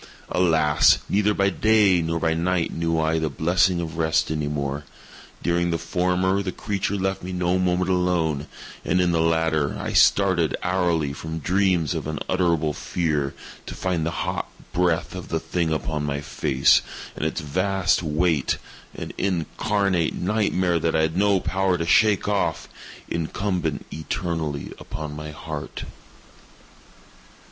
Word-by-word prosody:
Alas! 80 -4 +4
neither 105 +1 +2
by 100 -1 +2
day 105 -5 +4
nor 85 0 -1
by 80 0 +1
night 85 +1 0
knew 80 0 0
I 80 +1 +1
the 80 -1 -1
blessing 85 +5 +2
of 80 -2 -5
rest 80 -1 +1
any 75 -2 -1
more! 70 0 -3 0.6
During 85 0 +1
the 85 - 0
former 90 +3 0
the 95 -2 -3
creature 100 +1 -2
left 95 0 -1
me 90 - -6
no 90 0 0
moment 90 0 +1
alone, 85 -5 0 0.4
and 90 - +1
in 90 -1 +3
the 85 -1 +2
latter 80 -3 +1
I - - -4
started 95 -6 +4
hourly 85 -5 +1
from 80 +2 -6
dreams 90 -2 +1
of - - -4
unutterable 80 0 0
fear 75 -4 -1 0.3
to - - -6
find 90 -4 -1
the 80 - 0 0.2
hot - - -3 0.2
breath 90 -2 +1
of 90 -1 -7
the 80 - -1
thing 85 -1 -1
upon 80 -1 -2
my 70 -1 -2
face, 70 -2 +3 0.3
and - - -5
its 80 - -1
vast 95 +5 +1
weight—an 80 -2 -2
incarnate 95 0 0
nightmare 95 -3 +1
that 80 0 0
I 80 - +3
had 80 +1 0
no 100 0 +3
power 95 0 0
to 85 - -2
shake 105 +4 +4
off—incumbent 85 0 -3
eternally 80 -2 -3
upon 75 -1 -6
my 75 0 -6
_heart! 75 -1 -6
85 Hz, 145 wpm, -24 LUFS, 80-95 Hz, 0.6 s, Alas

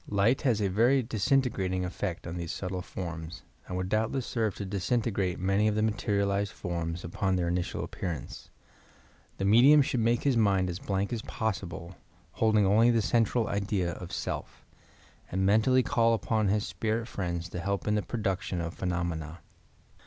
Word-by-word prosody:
Light 105 +5 +2
has 120 -7 +1
a - - +2
very 120 +8 +3
disintegrating 105 -5 0
effect 90 0 -4
on 85 0 -5
these 85 -2 -4
subtle 90 -1 -4
forms 85 -2 -6 0.2
and 90 - -4
would 90 0 -2
doubtless 110 +5 0
serve 110 -5 -1
to 100 - -5
disintegrate 100 -1 -1
many 95 +3 +2
of 105 - +1
the 110 - +1
materialized 100 -1 0
forms 85 -1 -4
upon 95 +2 -1
their 90 -2 0
initial 90 0 -2
appear 95 - -4
ance. 80 -4 -7 0.9
The 95 - -1
medium 130 +8 +7
should 125 - -1
make 115 +1 +2
his 140 -3 +2
mind 100 -5 +2
as 85 - -6
blank 100 +3 -2
as 115 - -2
possible, 95 -6 -4 0.3
holding 110 +1 +3
only 110 +5 +5
the 115 -2 +3
central 115 +1 +2
idea 100 -3 -1
of 90 +1 -8
self, - - -5 0.7
and 95 +1 0
men 105 +3 +5
tally 130 +2 +3
call 115 -1 +3
upon 110 -1 0
his 105 +2 +1
spirit 115 +1 -2
friends 85 -5 -3
to 90 - -5
help 100 +4 -2
in 105 - +2
the 105 - +2
produc 100 -5 -2
tion 90 -1 -3
of 85 0 -3
phenomena. 85 -3 -3
100 Hz, 175 wpm, -29 LUFS, 90-110 Hz, 0.9 s, medium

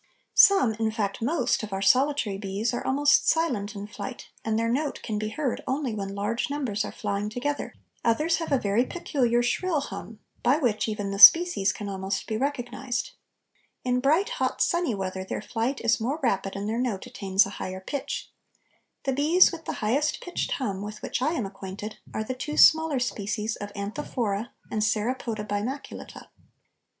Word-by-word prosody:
Some, 390 - +6
in 220 -1 +1
fact 210 -2 -2
most, 250 0 +1
of 215 -2 -6
our 195 0 -3
solitary 255 -4 +2
bees 205 +3 -2
are 240 - -2
almost 285 +2 +3
silent 235 -11 0
in 200 0 -5
flight, 210 +3 -8
and 220 -1 0
their 230 0 +1
note 280 +5 -1
can 215 -2 -2
be 215 0 -2
heard 265 +2 -2
only 265 -3 -1
when 195 -2 -4
large 210 +6 -1
numbers 255 -8 -1
are - - -5
flying 205 0 -3
together; 270 +6 -3 0.3
others 305 +9 +2
have 330 -2 -4
a 275 - +4
very 210 +1 +1
peculiar 250 -6 0
shrill 330 +6 0
hum, 225 -5 -7 0.2
by 255 +4 +3
which 235 -9 0
even 210 -2 -3
the 195 - -4
species 330 - +8
can 205 - -7
almost 195 0 -3
be 220 - -3
recognized. 245 0 -2 0.7
In 250 0 +1
bright, 315 - +2
hot, - - -2
sunny 345 - +1
weather 190 -1 -4
their 190 - -4
flight 235 +5 -2
is 230 -1 +2
more 270 +8 -1
rapid 195 -5 0
and 200 +1 -3
their 225 +2 -1
note 225 -7 -2
attains 195 0 +2
a 200 - -7
higher 185 0 -4
pitch. 280 +8 -5 0.7
The 270 - 0
bees 310 +7 +5
with 330 -2 -8
the - - -3
highest 280 +8 +1
pitched 355 - -3
hum 200 -8 -2
with 210 +1 -7
which - - -2
I 300 +5 +1
am 250 -11 -1
acquainted 195 +2 -7
are 215 - -2
the 255 - -3
two 295 +4 -5
smaller 320 -2 +6
species 220 -2 -2
of 205 0 -7
Anthophora 210 0 -3 0.2
and 215 - -1
Saropoda 215 0 -1
bimaculata. 220 +8 -5
230 Hz, 180 wpm, -26 LUFS, 205-280 Hz, 0.7 s, species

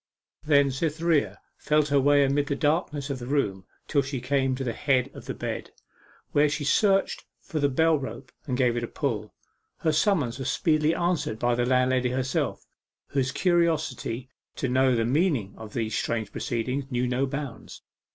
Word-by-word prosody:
Then 140 -2 +4
Cytherea 160 +2 0 0.2
felt 150 0 +2
her 140 0 +4
way 145 +1 +5
amid 140 +1 +1
the 140 - 0
darkness 150 -1 0
of 135 - -4
the 120 - -7
room 100 -10 -1 0.2
till 145 - +2
she 135 -1 -4
came 130 +1 0
to 135 - -4
the 120 -3 -2
head 135 0 +1
of - - -11
the - - -4
bed, - - -4 0.6
where 145 +1 +4
she 145 +1 -2
searched 195 +7 +2 0.2
for 155 - -4
the 145 -1 +2
bell 160 +3 +3
rope 120 -4 -7 0.2
and 125 -2 -1
gave 125 -2 +2
it 120 - -2
a - - -2
pull. 110 -8 -3 0.4
Her 160 - +1
summons 155 - +1
was 135 - -2
speedily 155 -2 +2
answered 170 -10 -1
by 120 +1 +1
the 120 +1 0
landlady 125 0 +2
herself, 130 +1 -2 0.4
whose 130 -2 0
curiosity 160 -9 0 0.3
to 130 - -2
know 130 0 +3
the 115 -1 +1
meaning 135 - +1
of 110 -1 -10
these 110 -2 -1
strange 110 -2 -2
proceedings 125 +4 -2
knew 125 -1 0
no 125 +2 0
bounds. 140 -3 -7
135 Hz, 180 wpm, -26 LUFS, 125-150 Hz, 0.6 s, way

